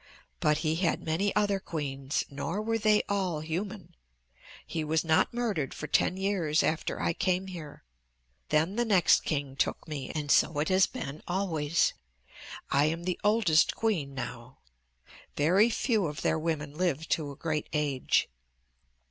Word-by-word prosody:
"But 150 Hz, 0 st, +2 dB
he 155 Hz, +1 st, +1 dB
had 170 Hz, -2 st, 0 dB
many 175 Hz, +6 st, 0 dB
other 205 Hz, -2 st, +2 dB
queens, 140 Hz, -5 st, -3 dB
nor 145 Hz, +7 st, -4 dB
were 225 Hz, +1 st, -1 dB
they 215 Hz, -1 st, +3 dB
all 185 Hz, -6 st, -1 dB
human. 185 Hz, +4 st, -5 dB, 0.7 s
He 160 Hz, -, -3 dB
was 155 Hz, +1 st, 0 dB
not 160 Hz, -1 st, +3 dB
murdered 220 Hz, -, -2 dB
for -, -, -5 dB
ten 180 Hz, +5 st, +1 dB
years 190 Hz, -6 st, +1 dB
after 160 Hz, -, -1 dB
I -, -, 0 dB
came 185 Hz, +1 st, 0 dB
here. 165 Hz, -6 st, -9 dB, 0.7 s
Then 160 Hz, +7 st, +1 dB
the 240 Hz, -, +3 dB
next 200 Hz, -7 st, +4 dB
king 140 Hz, -3 st, -2 dB
took -, -, -1 dB
me, 150 Hz, -4 st, -5 dB
and 150 Hz, -2 st, -2 dB
so 155 Hz, -1 st, +4 dB
it 150 Hz, +2 st, 0 dB
has 190 Hz, 0 st, +4 dB
been 150 Hz, -, -6 dB
always. 170 Hz, -4 st, +1 dB, 0.8 s
I 140 Hz, +1 st, +4 dB
am 165 Hz, +2 st, -1 dB
the 180 Hz, 0 st, -2 dB
oldest 205 Hz, -7 st, +3 dB
queen 165 Hz, -12 st, -1 dB
now. 125 Hz, -1 st, -7 dB, 0.8 s
Very 185 Hz, +10 st, +4 dB
few 220 Hz, -5 st, +1 dB
of 150 Hz, 0 st, -6 dB
their 160 Hz, -, +1 dB
women 155 Hz, -3 st, -2 dB
live 160 Hz, -2 st, -1 dB
to 155 Hz, -5 st, 0 dB
a 140 Hz, -, -8 dB
great 155 Hz, 0 st, -3 dB
age. 145 Hz, -4 st, +1 dB
160 Hz, 155 wpm, -29 LUFS, 150-190 Hz, 0.8 s, next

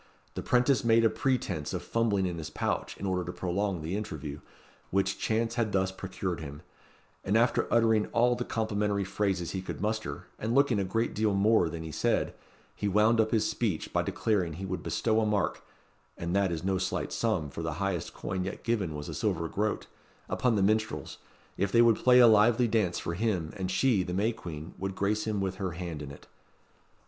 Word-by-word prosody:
The -, -, -4 dB
'prentice 125 Hz, +2 st, +3 dB
made 115 Hz, 0 st, +4 dB
a 110 Hz, -, +4 dB
pretence 100 Hz, -, -1 dB
of -, -, -4 dB
fumbling 110 Hz, -4 st, +1 dB
in 85 Hz, -2 st, -3 dB
his 80 Hz, -, -5 dB
pouch -, -, -2 dB
in -, -, -5 dB
order 90 Hz, -1 st, 0 dB
to 90 Hz, -, -5 dB
prolong 95 Hz, -1 st, -2 dB
the 85 Hz, +5 st, -2 dB
interview, 75 Hz, -9 st, -5 dB, 0.5 s
which 95 Hz, 0 st, 0 dB
chance 115 Hz, +1 st, 0 dB
had 110 Hz, -2 st, 0 dB
thus 95 Hz, 0 st, +1 dB
procured 95 Hz, -2 st, -4 dB
him; 75 Hz, 0 st, -8 dB, 0.6 s
and 100 Hz, +3 st, +2 dB
after 120 Hz, +2 st, +2 dB
uttering 110 Hz, -2 st, +3 dB
all 120 Hz, +1 st, +3 dB
the 120 Hz, 0 st, -2 dB
complimentary 105 Hz, -3 st, -1 dB
phrases 95 Hz, -3 st, -1 dB
he 95 Hz, -, -3 dB
could 95 Hz, -, -6 dB
muster, 105 Hz, -8 st, -3 dB
and 115 Hz, +3 st, -1 dB
looking 140 Hz, -6 st, +4 dB
a -, -, +1 dB
great 115 Hz, +5 st, -1 dB
deal 105 Hz, -1 st, +1 dB
more 100 Hz, -3 st, +4 dB
than 80 Hz, 0 st, -6 dB
he 80 Hz, -, -6 dB
said, -, -, 0 dB, 0.4 s
he 105 Hz, -, -2 dB
wound 110 Hz, +3 st, +4 dB
up 110 Hz, -, 0 dB
his 110 Hz, -2 st, +2 dB
speech 105 Hz, -9 st, -2 dB
by -, -, +3 dB
declaring 95 Hz, -7 st, 0 dB
he 95 Hz, +5 st, -6 dB
would 95 Hz, -1 st, -3 dB
bestow 110 Hz, -1 st, +1 dB
a -, -, +1 dB
mark 105 Hz, -2 st, 0 dB, 0.6 s
(and 85 Hz, +2 st, -2 dB
that 100 Hz, -1 st, +3 dB
was 85 Hz, -1 st, -3 dB
no 95 Hz, 0 st, +1 dB
slight 95 Hz, 0 st, -2 dB
sum, 90 Hz, -11 st, 0 dB
for 80 Hz, -, -6 dB
the 80 Hz, -1 st, -2 dB
highest 95 Hz, 0 st, -2 dB
coin 95 Hz, -1 st, -3 dB
yet 95 Hz, +2 st, -6 dB
given 100 Hz, -9 st, -1 dB
was 75 Hz, 0 st, -6 dB
a -, -, -5 dB
silver 90 Hz, -7 st, -1 dB
groat) 105 Hz, +5 st, -1 dB, 0.4 s
upon 125 Hz, -3 st, +1 dB
the 100 Hz, -, +2 dB
minstrels, 110 Hz, -8 st, 0 dB, 0.4 s
if 100 Hz, 0 st, 0 dB
they 115 Hz, +1 st, +6 dB
would 115 Hz, -2 st, +5 dB
play 125 Hz, 0 st, +5 dB
a 125 Hz, -, +9 dB
lively 115 Hz, +2 st, +5 dB
dance 105 Hz, -6 st, +1 dB
for 85 Hz, -, -3 dB
him, 90 Hz, -5 st, -1 dB
and 95 Hz, -2 st, -3 dB
she, 110 Hz, +1 st, +3 dB
the 90 Hz, 0 st, -3 dB
May 105 Hz, +4 st, +2 dB
Queen, 80 Hz, -6 st, -8 dB
would 95 Hz, 0 st, -3 dB
grace 105 Hz, +3 st, 0 dB
him 105 Hz, -2 st, 0 dB
with 95 Hz, -1 st, -2 dB
her 95 Hz, -3 st, -3 dB
hand 85 Hz, -3 st, -5 dB
in 70 Hz, -, -6 dB
it. 70 Hz, -, -12 dB
100 Hz, 210 wpm, -29 LUFS, 90-110 Hz, 0.6 s, a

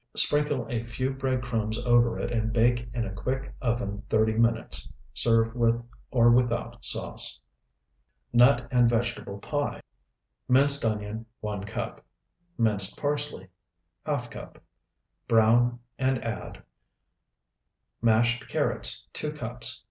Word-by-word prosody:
Sprinkle 145 Hz, -2 st, +2 dB
a 120 Hz, -4 st, -2 dB
few 130 Hz, +3 st, -2 dB
bread 130 Hz, -1 st, -1 dB
crumbs 110 Hz, -3 st, -2 dB
over 120 Hz, -1 st, +3 dB
it, -, -, -3 dB
and 110 Hz, -1 st, 0 dB
bake 120 Hz, +1 st, +2 dB
in 120 Hz, -1 st, -2 dB
a 100 Hz, -, -5 dB
quick 130 Hz, +7 st, -3 dB
oven 115 Hz, -4 st, -1 dB
thirty 110 Hz, 0 st, +3 dB
minutes. 115 Hz, +1 st, 0 dB, 0.2 s
Serve 115 Hz, -, +2 dB
with 115 Hz, -1 st, +2 dB, 0.3 s
or 120 Hz, -2 st, +5 dB
without 120 Hz, 0 st, +1 dB
sauce. -, -, +1 dB, 0.9 s
NUT 125 Hz, +4 st, +5 dB
AND 125 Hz, -2 st, +4 dB
VEGETABLE 120 Hz, -3 st, -2 dB
PIE 145 Hz, +7 st, -2 dB, 0.7 s
Minced 140 Hz, +2 st, +5 dB
onion, 110 Hz, 0 st, -2 dB
1 105 Hz, -2 st, -4 dB
cup. 100 Hz, -, -5 dB, 0.5 s
Minced 105 Hz, -4 st, +1 dB
parsley, 145 Hz, -9 st, -2 dB, 0.6 s
½ -, -, -2 dB
cup. -, -, -10 dB, 0.6 s
Brown 120 Hz, +2 st, +4 dB, 0.2 s
and 130 Hz, -1 st, +2 dB
add 115 Hz, -1 st, -6 dB, 1.4 s
Mashed 120 Hz, +2 st, +2 dB
carrots, -, -, -1 dB
2 -, -, -3 dB
cups. -, -, -5 dB
120 Hz, 120 wpm, -27 LUFS, 110-125 Hz, 1.4 s, or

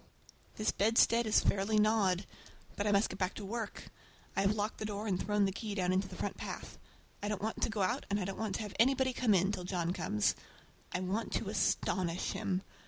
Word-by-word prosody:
This 215 Hz, -, +1 dB
bedstead 230 Hz, +2 st, +4 dB
is 215 Hz, -, +5 dB
fairly 200 Hz, +2 st, +1 dB
gnawed! 210 Hz, -3 st, +3 dB, 0.5 s
But 205 Hz, -, -1 dB
I -, -, +3 dB
must 200 Hz, +2 st, +4 dB
get 185 Hz, -1 st, -1 dB
to 205 Hz, -, -6 dB
work. 220 Hz, +1 st, -5 dB, 0.5 s
I -, -, +2 dB
have 195 Hz, +2 st, +2 dB
locked 210 Hz, +1 st, -2 dB
the 215 Hz, -, -3 dB
door 210 Hz, 0 st, -3 dB
and 190 Hz, -4 st, 0 dB
thrown 210 Hz, -1 st, +2 dB
the 195 Hz, -, 0 dB
key 210 Hz, +1 st, -5 dB
down 185 Hz, -2 st, +1 dB
into 190 Hz, +1 st, +1 dB
the -, -, -9 dB
front -, -, -3 dB
path. -, -, -7 dB, 0.4 s
I 205 Hz, -, -2 dB
don't 210 Hz, -2 st, -1 dB
want 220 Hz, -, -2 dB
to -, -, +2 dB
go 215 Hz, -3 st, 0 dB
out, 185 Hz, -, -1 dB
and 200 Hz, +1 st, +1 dB
I 185 Hz, -, -2 dB
don't 195 Hz, 0 st, -5 dB
want 220 Hz, -3 st, -1 dB
to -, -, -2 dB
have 210 Hz, -, -7 dB
anybody 260 Hz, +2 st, +4 dB
come 235 Hz, -5 st, +3 dB
in, 190 Hz, +2 st, +3 dB
till 185 Hz, -3 st, -4 dB
John 180 Hz, -1 st, -1 dB
comes. 105 Hz, -, +1 dB, 0.6 s
I 180 Hz, -, -1 dB
want 195 Hz, +5 st, -2 dB
to -, -, -1 dB
astonish 180 Hz, -2 st, 0 dB
him. 190 Hz, 0 st, -1 dB
200 Hz, 225 wpm, -33 LUFS, 185-215 Hz, 0.6 s, is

